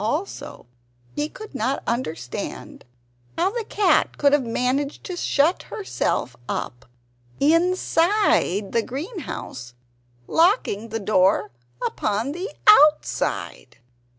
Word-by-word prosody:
Also 300 - -4 0.5
he 295 +1 -1
could 435 +1 -11
not 265 +2 -1
understand 165 - -5 0.5
how 365 +3 +2
the 470 +1 -3
cat 400 -5 +2
could 285 -1 +3
have 290 - +4
managed 255 +4 -1
to 365 - -5
shut 325 0 +1
herself 255 - -2
up 120 +1 -4 0.5
INSIDE 330 - +2
the 230 - +2
greenhouse, 260 - -7 0.5
locking 320 - +2
the 225 +1 -3
door 190 -7 +2 0.3
upon 215 +6 -1
the 360 +7 -5 0.2
OUTSIDE. 300 - +3
285 Hz, 100 wpm, -23 LUFS, 215-355 Hz, 0.5 s, have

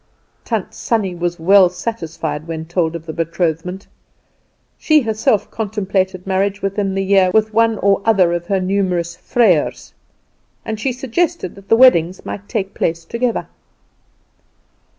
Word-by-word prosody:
Tant - - -3
Sannie 215 -6 -1
was 175 0 -3
well 190 +2 +6
satisfied 165 -6 -5
when 160 -1 -5
told 170 -1 -1
of 165 -1 -7
the 160 - -6
betrothment. 165 +3 -2 0.9
She 310 -1 +4
herself 220 -2 0
contemplated 195 -4 -2
marriage 195 +1 -1
within 195 0 -1
the 195 - 0
year 190 -1 +4
with 215 +2 +1
one 225 0 +3
or 200 0 +2
other 190 -6 +3
of 175 0 -3
her 195 0 +1
numerous 185 -3 -1
vrijers, 195 -11 +1 0.7
and 220 -1 -4
she 260 +4 -1
suggested 265 - -2
that 195 0 -16
the - - +6
weddings 185 -8 +4
might 205 0 -7
take 200 -4 -3
place 165 0 -2
together. 235 +5 -2
195 Hz, 140 wpm, -18 LUFS, 175-220 Hz, 0.9 s, well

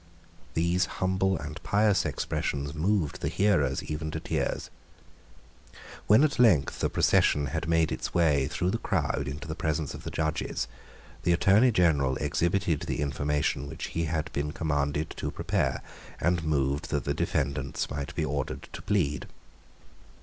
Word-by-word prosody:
These 85 +2 +2
humble 95 0 +1
and 75 +1 -7
pious 100 -4 +2
expressions 70 0 -2
moved 85 -1 0
the - - -1
hearers, 75 -10 +2
even 80 +1 -4
to 80 - -3
tears. - - -2 1.4
When 110 +7 +6
at 150 -4 +1
length 90 - +4
the - - +1
procession 75 0 +3
had 80 +1 -2
made 80 -1 +3
its - - -3
way 75 -6 +3
through 90 +1 -1
the 115 - -1
crowd 70 - -1
into 75 +5 -6
the 80 - -3
presence 80 -2 -2
of - - -8
the - - -5
judges, 80 -5 -2 0.5
the 85 - +2
Attorney 100 +8 +5
General 75 - +3
exhibited 85 -2 +1
the - - -3
information 70 -1 -1
which 80 +1 -6
he 85 -1 -1
had 80 -1 -2
been 75 +2 -2
commanded 75 -1 -1
to - - -2
prepare, - - -1 0.4
and 85 -1 +1
moved 70 0 0
that 70 -3 -1
the - - -1
defendants 70 +1 -1
might 70 -1 -4
be - - 0
ordered 70 -1 -3
to - - -6
plead. 90 -9 0
80 Hz, 155 wpm, -28 LUFS, 70-90 Hz, 1.4 s, When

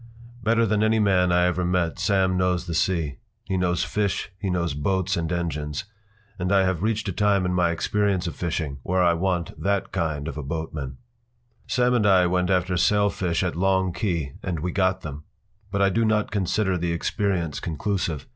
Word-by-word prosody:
Better 115 0 +3
than 105 -1 +1
any 110 +1 +3
man 95 -4 +3
I 90 0 +4
ever 90 0 0
met 90 -2 0
Sam 95 -2 +2
knows 90 -1 +1
the 85 - -4
sea; 80 -4 0 0.3
he 95 - -3
knows 90 -2 +1
fish, 100 -1 -1
he 100 - -2
knows 85 -4 0
boats 95 +5 0
and 85 -1 -2
engines. 75 -4 -2 0.6
And 90 +1 -1
I 100 -1 +5
have 95 -3 0
reached 110 0 0
a - - 0
time 100 0 +2
in 90 - 0
my 90 -1 +2
experience 95 +2 0
of 85 - -4
fishing 80 -5 -3
where 90 +6 +1
I 85 -1 +4
want 90 -1 -1
that 100 0 0
kind 75 -2 -2
of 80 - -5
a - - -4
boatman. 75 -3 -5 0.7
Sam 125 0 +2
and 110 -4 +3
I 95 -2 +5
went 90 0 +1
after 90 -1 +1
sailfish 95 -3 +2
at 90 -3 -1
Long 95 0 +1
Key 85 -7 -2
and 85 -5 -3
we 90 +2 -2
got 95 0 +1
them. 75 0 -7 0.5
But 100 0 +1
I 100 - +3
do 115 +5 +1
not 110 -1 +1
consider 95 -1 0
the 85 0 -1
experience 85 -3 -1
conclusive. 85 -1 -2
90 Hz, 195 wpm, -24 LUFS, 85-100 Hz, 0.7 s, I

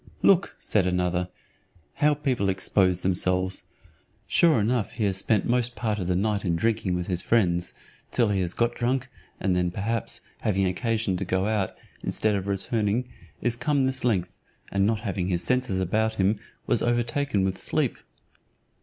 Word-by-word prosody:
"Look," 195 -1 +4
said 95 -4 +1
another, 90 0 0 0.6
"how 150 0 +3
people 130 -9 0
expose 95 -1 +2
themselves; 90 0 +1 0.6
sure 165 -8 +4
enough 110 -1 0
he 110 - -2
has 95 -2 +1
spent 105 +2 +1
most 120 0 0
part 105 0 -1
of 90 - -3
the 90 - +1
night 105 +1 0
in 85 -3 +1
drinking 105 -1 0
with 90 0 -2
his 90 -1 -2
friends, 90 -6 +1 0.3
till 120 -3 +2
he 100 -2 +1
has 90 -1 -2
got 120 0 +1
drunk, 130 +2 -1 0.3
and 95 -2 +1
then, 90 0 +1
perhaps, 110 +5 -2 0.2
having 100 -2 +1
occasion 110 0 0
to 95 - -2
go 95 +1 0
out, 105 -3 0 0.3
instead 110 -1 0
of 100 -1 -2
returning, 105 +4 0 0.3
is 120 -1 +2
come 140 +2 +1
this 130 0 -1
length, 95 -7 +1 0.4
and 100 0 +2
not 110 -1 0
having 100 -5 -2
his 90 -2 0
senses 125 -7 +1
about 110 +4 0
him, 100 +1 +2 0.3
was - - +1
overtaken 120 -1 +1
with 95 0 -1
sleep." - - 0
100 Hz, 170 wpm, -26 LUFS, 95-120 Hz, 0.6 s, Look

